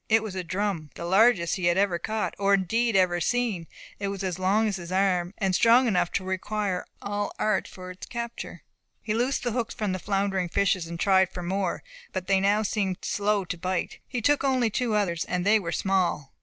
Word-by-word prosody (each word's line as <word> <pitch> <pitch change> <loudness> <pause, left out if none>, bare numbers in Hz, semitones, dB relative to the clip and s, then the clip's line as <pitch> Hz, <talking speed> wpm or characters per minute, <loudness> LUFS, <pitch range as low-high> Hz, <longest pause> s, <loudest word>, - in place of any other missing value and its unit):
It 225 0 +4
was 215 -4 -5
a 185 -1 -3
drum, 185 -3 -2
the 170 - -6
largest 195 -1 +4
he 185 - -2
had 175 +1 +3
ever 190 -3 +2
caught, 220 +5 -2
or 200 0 +4
indeed 225 +4 0
ever 180 -2 +3
seen. 220 -5 0 0.3
It 200 - -2
was 195 0 -4
as 185 -1 -3
long 200 +4 +2
as 200 -2 -1
his 175 -1 -8
arm, 185 -2 +1
and 195 -2 0
strong 235 +6 +5
enough 180 -6 +1
to 190 - 0
require 190 0 -2 0.2
all 205 0 -1
his - - -11
art 215 -3 0
for 185 0 -9
its 185 - -10
capture. 235 -1 -6 0.4
He 215 - -1
loosed 245 +5 0
the 240 - -1
hooks 230 -1 -2
from 210 -4 -1
the 185 - -2
floundering 195 -2 -1
fishes, 190 -2 +1
and 170 0 -7
tried 190 -1 +4
for 180 -2 -7
more. 190 0 -2 0.3
But 185 -1 -3
they 195 0 +3
now 205 +2 +2
seemed 195 -3 -1
slow 205 -1 0
to 180 0 -4
bite. 185 0 -2
He 240 -3 -4
took 290 +2 +3
only 255 -4 +2
two 235 -1 0
others, 175 -5 0
and 180 0 -2
they 215 +2 +5
were 170 -4 -4
small. 180 -7 0
195 Hz, 220 wpm, -26 LUFS, 180-215 Hz, 0.4 s, strong